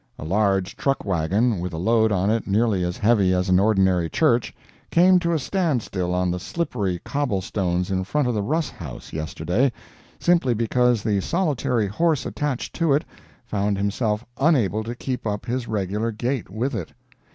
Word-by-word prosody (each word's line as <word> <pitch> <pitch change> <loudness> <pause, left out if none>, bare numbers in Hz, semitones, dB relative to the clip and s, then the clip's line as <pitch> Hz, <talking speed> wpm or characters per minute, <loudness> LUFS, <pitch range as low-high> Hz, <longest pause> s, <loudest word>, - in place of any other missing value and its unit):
A - - -7
large 95 +1 +1
truck 135 -1 -1
wagon, 100 +5 +1
with 90 0 -4
a - - -4
load 110 +4 +2
on 100 +1 +1
it 115 0 -1
nearly 105 -2 +2
as 90 0 -2
heavy 100 -4 +3
as 90 +1 0
an 90 0 +5
ordinary 95 -5 +2
church, 125 - +2 0.4
came 180 +2 +5
to 170 -1 -1
a 165 - +2
stand 155 - 0
still 90 -2 -2
on 90 0 +1
the 90 - -2
slippery 100 - -2
cobble 140 -9 -1
stones 90 -1 -1
in 95 0 0
front 140 +7 0
of 125 - 0
the 105 - 0
Russ 155 +8 -1
House, 75 -8 -9
yesterday, 85 - 0 0.5
simply 170 -9 +2
because 115 0 +2
the 100 -3 +1
solitary 145 - 0
horse 155 - 0
attached 145 -4 -3
to 165 -4 +2
it 145 - +1 0.4
found 100 -1 -1
himself 105 +2 -1
unable 120 - +2
to 115 +2 -5
keep 125 -2 -4
up 105 -1 -3
his 120 0 -2
regular 105 +2 -1
gait 120 +3 -3
with 120 +8 -2
it. 100 -8 -5
110 Hz, 180 wpm, -23 LUFS, 95-130 Hz, 0.5 s, an